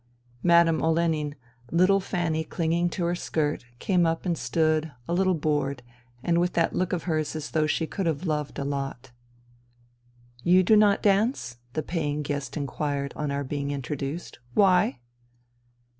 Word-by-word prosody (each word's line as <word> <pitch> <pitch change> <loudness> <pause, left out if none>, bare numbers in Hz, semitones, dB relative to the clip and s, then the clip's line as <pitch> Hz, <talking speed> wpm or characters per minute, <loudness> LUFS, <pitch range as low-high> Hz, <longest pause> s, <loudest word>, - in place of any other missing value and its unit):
Madame 170 -2 +4
Olenin, 160 -3 +1 0.3
little 185 +4 +4
Fanny 175 -4 -1
clinging 170 +2 0
to 175 -1 -2
her 170 - +1
skirt, 150 -6 -1
came 180 - +2
up 165 +1 0
and 175 -2 +1
stood, 155 -1 +1 0.2
a - - -1
little 185 0 +2
bored, 145 -4 -1 0.4
and 170 0 +2
with 175 0 +1
that 165 -1 +1
look 185 -1 0
of 175 -3 -1
hers 155 -3 -1
as 155 -1 -5
though 155 -1 +2
she 160 - 0
could 185 +3 -3
have 160 +2 -1
loved 150 -3 -2
a 140 - -3
lot. 135 -2 -4 0.7
*' 120 0 -34 0.5
You 185 +2 +5
do 215 +4 +5
not 210 -1 +4
dance? 200 - +1
" 120 - -35
the 155 - -2
paying 150 -3 -2
guest 140 -1 -4
inquired 140 -1 -2
on 150 -1 -2
our 140 0 -1
being 140 +1 -3
introduced. 140 +3 -4
" 120 - -29
Why 180 -10 +4
160 Hz, 170 wpm, -26 LUFS, 145-175 Hz, 0.7 s, You